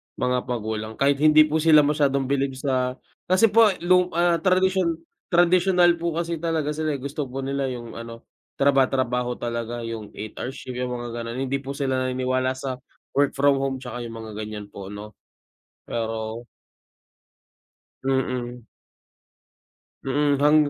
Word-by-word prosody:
mga 125 0 0
magulang, 110 -2 -3
kahit 140 0 +2
hindi 155 0 +7
po 155 +1 0
sila 155 -1 +6
masyadong 145 -2 +2
bilib 135 0 0
sa 130 -2 -1 0.3
kasi 190 +4 +4
po 225 +1 +7 0.2
lu 180 0 +4
ah, 170 -1 +3
tradisyon 185 -1 +2 0.3
tradisyonal 175 0 +4
po 170 -1 -2
kasi 170 -1 -2
talaga 160 -2 -1
sila 155 -1 -1
eh 135 - -7
gusto 140 +1 -4
po 135 +2 -5
nila 135 0 -1
'yung 120 -3 -6
ano, 115 0 -8 0.3
traba 135 -2 +4
trabaho 125 -2 -1
talaga 120 0 -4
'yung 115 -2 -6
8 110 +1 -7
hour 125 - -3
shift 125 - -8
'yung 125 -1 -2
mga 120 0 -5
ganun, 115 +1 -5
hindi 135 +1 -1
po 140 0 -6
sila 130 -2 0
naniniwala 130 0 0
sa 130 -1 -5 0.3
work 140 0 +2
from 140 0 +3
home 135 -1 -1
'tsaka 125 -1 -7
'yung 115 - -9
mga 110 -1 -8
ganiyan 105 -1 -6
po 100 -1 -8
ano. 105 +1 -8 0.8
Pero 115 0 -3 1.6
Mm. 125 -3 -2 1.4
Mm, 145 +1 +2
hang 150 +1 +6
135 Hz, 155 wpm, -24 LUFS, 120-155 Hz, 1.6 s, hindi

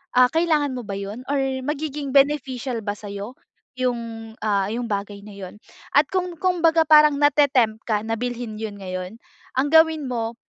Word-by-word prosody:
ah, 250 0 +7
kailangan 315 -4 +2
mo 250 - -4
ba 200 - -4
yun, 200 +3 -6
or 285 - 0 0.3
magiging 295 -1 -3
beneficial 270 -3 +1
ba 205 -1 -3
sa'yo, 205 +3 -7 0.4
yung, 255 -2 -1 0.4
ah, 200 -2 +1
yung 240 +2 -3
bagay 200 0 -4
na 210 - -11
yun? 195 0 -9 0.4
At 295 - +6
kung 360 -2 -1
kumbaga 335 -2 +3
parang 300 -1 +6
nate-tempt 265 -7 +3
ka 215 -2 +1
na 225 - -2
bilhin 245 -2 -4
yun 210 -2 -5
ngayon, 185 +2 -6 0.4
ang 275 - +2
gawin 320 -2 +5
mo, 230 -1 -3
250 Hz, 165 wpm, -23 LUFS, 210-295 Hz, 0.4 s, ah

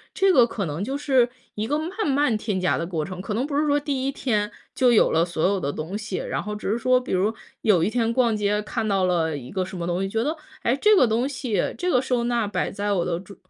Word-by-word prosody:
这 390 -1 +4
个 245 -5 +6
可 205 -3 -3
能 155 +4 -3
就 270 +6 -2
是 260 -4 +3 0.3
一 215 +1 -2
个 295 +4 +1
慢 360 +6 -3
慢 280 -4 +2
添 210 -3 -2
加 180 - +1
的 165 - -2
过 160 -4 -2
程。 185 +1 -6
可 210 - -4
能 250 - 0
不 285 - -4
是 300 - +2
说 290 0 +3
第 275 -2 -2
1 275 - 0
天 210 -7 -1 0.2
就 250 -2 +4
有 230 - +4
了 165 +1 +3
所 170 0 0
有 200 -1 0
的 140 -2 -2
东 160 +7 -5
西， 210 -3 -4
然 - - -3
后 210 0 -4
只 210 -1 -3
是 225 - +1
说 255 +1 +3
比 250 - -7
如， 190 +4 +2 0.3
有 195 -7 +3
一 185 - +2
天 230 -1 +1
逛 235 -3 +2
街 210 0 +1
看 220 +1 -3
到 195 -2 +1
了 160 -4 +1
一 125 -2 -9
个 190 -1 -1
什 185 - -8
么 170 - -3
东 175 +1 -1
西， 195 - -1
觉 225 +2 0
得， 310 +4 -1 0.3
哎， 240 - +2
这 420 +9 +4
个 370 - +6
东 230 +4 +1
西， 250 -8 -2
这 360 +1 -1
个 250 - +3
收 250 -2 0
纳 235 -3 0
摆 205 - -1
在 205 +1 -2
我 175 -3 0
的 170 -1 -1
桌 195 +2 -12
215 Hz, 300 characters per minute, -24 LUFS, 185-255 Hz, 0.3 s, 个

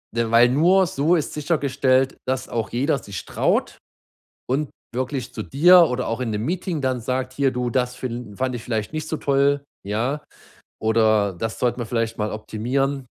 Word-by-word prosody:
Denn 115 -1 0
weil 115 +1 +7
nur 175 +8 +4
so 155 +4 +2
ist 155 - -3
sichergestellt, 135 -4 +1
dass 130 0 -2
auch 115 -2 -3
jeder 140 +3 0
sich 100 -3 -7
traut - - 0 0.7
und 140 +3 0 0.2
wirklich 130 0 -3
zu - - -4
dir 175 +6 +6
oder 125 0 -2
auch 115 - -2
in 125 - -1
'nem 105 +1 -2
Meeting 175 0 -2
dann 130 -2 -1
sagt: 130 +2 -2
„Hier 135 0 +1
du, 125 -1 -2
das 125 0 0
fin 120 -4 -6
fand 130 0 -1
ich 115 - -6
vielleicht 110 0 -3
nicht 155 0 -4
so 160 - -2
toll“, 140 0 +2 0.2
ja, 120 +9 -2 0.6
oder 110 -2 +3
„das 110 +5 -4
sollten 125 0 0
wir 120 - -2
vielleicht 115 -1 -2
mal 105 0 -2
optimieren“, 130 +6 -2
130 Hz, 180 wpm, -22 LUFS, 115-140 Hz, 0.7 s, weil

